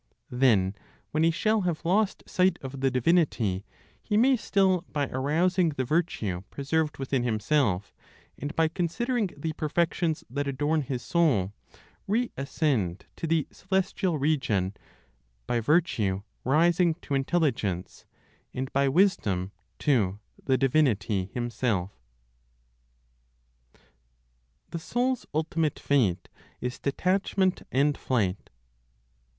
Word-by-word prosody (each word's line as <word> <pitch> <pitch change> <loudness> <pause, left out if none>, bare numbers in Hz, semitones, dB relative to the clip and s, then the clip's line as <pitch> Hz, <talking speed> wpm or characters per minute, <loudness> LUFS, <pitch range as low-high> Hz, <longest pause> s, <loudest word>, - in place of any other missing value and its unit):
Then, 115 -7 +3 0.4
when 155 - 0
he 165 - +5
shall 215 +6 +1
have 175 -4 -2
lost 195 +4 +1
sight 185 +1 +2
of 135 0 -6
the 135 - +3
divinity, 125 - +1 0.3
he 210 - 0
may 260 +4 +5
still, 195 -5 +2
by 145 -2 0
arousing 165 +7 +1
the 140 -4 -2
virtue 120 - -1
preserved 150 +2 -1
within 135 -1 -1
himself, 110 -3 0 0.4
and 145 +3 -6
by 165 0 +3
considering 200 +7 -1
the 155 +2 -3
perfections 160 +1 0
that 140 +4 -3
adorn 145 +3 0
his 130 -2 -4
soul, 130 - +2 0.5
reascend 140 - -1
to 165 - -4
the 160 -2 +1
celestial 190 -2 -1
region, 125 -10 0 0.7
by 120 - 0
virtue 110 - +1 0.2
rising 165 +4 +3
to 145 - -7
Intelligence, 135 - -1 0.5
and 130 +1 -4
by 140 0 +3
wisdom 110 - +2 0.3
to 105 -10 +1 0.3
the 130 -1 +2
Divinity 115 - +2
Himself. 115 -6 -1 2.8
THE 170 - -3
SOUL'S 250 +8 -1
ULTIMATE 155 -1 0
FATE 105 -11 +1 0.3
IS 125 0 -4
DETACHMENT 185 +5 +1
AND 140 +2 +2
FLIGHT. 105 -7 -1
145 Hz, 110 wpm, -27 LUFS, 120-170 Hz, 2.8 s, he